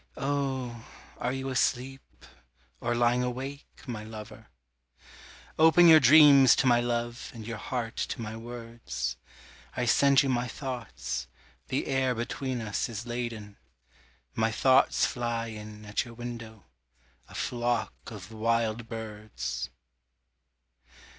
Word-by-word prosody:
Oh 135 -4 -2 0.4
are 125 - -1
you 135 0 -3
asleep, 130 +1 -2 0.5
or 120 0 -1
lying 120 +1 +3
awake, 130 +3 -6
my 115 -5 -5
lover? 110 -1 -10 1.1
Open 160 +2 +7
your 160 -1 +9
dreams 140 -1 +8
to - - +1
my 120 -2 +5
love 120 0 -2
and 110 -2 -8
your 115 -1 -5
heart 120 -3 -4
to - - -3
my 110 -1 -5
words, 115 - -5 0.6
I 125 - 0
send 140 +3 +5
you - - -1
my 125 -1 0
thoughts 115 - -5 0.4
the - - -1
air 130 -2 +1
between 125 +2 -3
us 110 +3 -2
is 115 0 -6
laden, 120 -4 -5 0.8
My 110 0 +1
thoughts 130 +4 +4
fly 120 -1 -2
in 105 -1 -9
at 105 0 -1
your 120 -1 -12
window, 115 -3 -8 0.6
a - - -13
flock 120 -1 -1
of 105 -2 -9
wild 115 0 0
birds. 105 - -5
120 Hz, 125 wpm, -28 LUFS, 110-130 Hz, 1.1 s, your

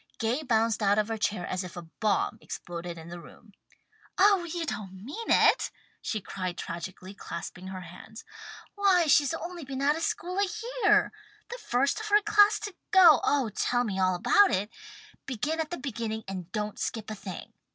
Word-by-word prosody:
Gay 235 +6 0
bounced 225 -5 +1
out 205 0 +3
of 215 +1 +1
her 225 - -2
chair 205 -4 -1
as 185 +1 -3
if 180 -1 -9
a 175 - -6
bomb 205 +6 -1
exploded 170 0 -7
in 165 +1 -10
the 175 0 -7
room. 210 +5 -16 0.7
"Oh 390 -2 +5
you 340 0 -3
don't 190 -8 -6
mean 380 - -6
it!" - - +4 0.3
she 215 - -2
cried 185 -2 -5
tragically, 185 +3 -7
clasping 180 -1 -7
her 190 -1 -6
hands. 220 +4 -12 0.5
"Why 390 -4 +3
she's 290 -1 +4
only 345 0 -6
been 265 -1 -6
out 290 +2 +3
of 325 - -5
school 365 +3 -2
a 400 - +3 0.4
year! - - +4 0.4
The 485 - -6
first 275 - 0
of 430 -1 -6
our 415 +1 +6
class 420 0 +5
to 415 -2 -5 0.2
go! 345 -7 +7
Oh 275 -5 +2
tell 245 +3 +1
me 195 -5 -3
all 185 -1 +2
about 410 - +5
it! 205 +4 -1 0.6
Begin 290 +6 -2
at 315 -1 -2
the 350 - -4
beginning 225 -4 -4
and 185 -2 -6
don't 210 -1 -3
skip 220 -2 -4
a - - -4
thing!" 190 -3 -8
225 Hz, 190 wpm, -28 LUFS, -, 0.7 s, go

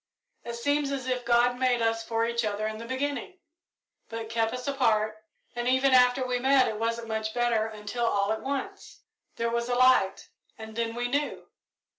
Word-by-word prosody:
It 235 0 -5
seems 285 +4 0
as 270 -2 -3
if 250 -1 -2
God 240 +1 +3
made 255 -2 +2
us 225 0 0
for 225 0 0
each 235 0 -1
other 210 0 -2
in 215 0 -4
the 230 - -8
beginning, 285 +7 -3 0.7
but 225 -1 -6
kept 225 -1 +1
us 250 +1 -6
apart, 220 -6 +1 0.4
and 240 0 -2
even 260 +1 +3
after 250 +1 +5
we 250 -1 -1
met 265 +1 +4
it 215 - -3
wasn't 230 0 -2
much 220 0 -3
better 235 -2 +1
until 220 +2 -3
all 200 -1 +1
at 220 - -5
once 275 0 -5 0.3
there 230 0 -1
was 235 +1 -1
a 245 - +1
light, 250 -6 +3 0.3
and 220 0 -9
then 230 0 -2
we 245 0 -1
knew. 285 +3 -2
235 Hz, 190 wpm, -27 LUFS, 225-255 Hz, 0.7 s, after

